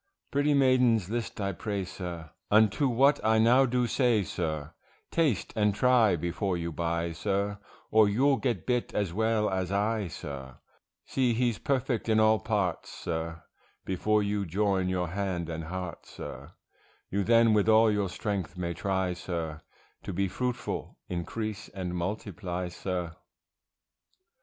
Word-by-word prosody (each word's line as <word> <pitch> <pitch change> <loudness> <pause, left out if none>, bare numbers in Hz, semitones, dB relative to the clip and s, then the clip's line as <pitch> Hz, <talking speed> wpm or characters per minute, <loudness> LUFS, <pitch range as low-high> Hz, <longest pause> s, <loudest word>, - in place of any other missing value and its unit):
Pretty 145 +1 +2
maidens 125 -7 +3
list 120 -2 -3
I 100 -1 0
pray, 100 0 -3
sir, 85 -3 -7 0.2
Unto 110 +6 +4
what 135 +4 +3
I 110 0 +4
now 120 +4 +5
do 125 0 +1
say, 120 -3 +2
sir, 80 -3 -3 0.4
Taste 150 - +1
and 105 -2 +2
try 125 -6 +4
before 85 +3 -1
you 85 0 -3
buy, 85 +1 -1
sir, 100 +4 -1 0.3
Or 110 -1 +6
you'll 135 +6 +3
get 120 -10 -1
bit 125 -1 -1
as 100 -5 0
well 110 +1 +1
as 95 -1 -1
I, 105 0 0
sir; 70 -4 -8 0.5
See 125 -3 +1
he's 120 -2 +1
perfect 130 -4 -1
in 110 0 +4
all 110 0 +5
parts, 100 -5 -1
sir, 80 0 -4 0.4
Before 105 +3 +1
you 100 0 -1
join 95 +1 0
your 90 -2 -1
hand 90 -2 -2
and 80 0 -4
heart, 90 0 -6
sir, - - -9 0.6
You 100 +1 +1
then 115 +1 +5
with 105 0 +3
all 110 0 +6
your 100 -2 0
strength 95 -2 -3
may 85 -1 -2
try, 95 +1 -1
sir, 85 -3 -4 0.4
To - - -5
be 100 +2 0
fruitful, 125 +6 -3
increase, 105 +4 -4
and 90 -3 -5
multiply, 90 -1 -3
sir. 90 -2 -4
100 Hz, 145 wpm, -29 LUFS, 90-115 Hz, 0.6 s, Or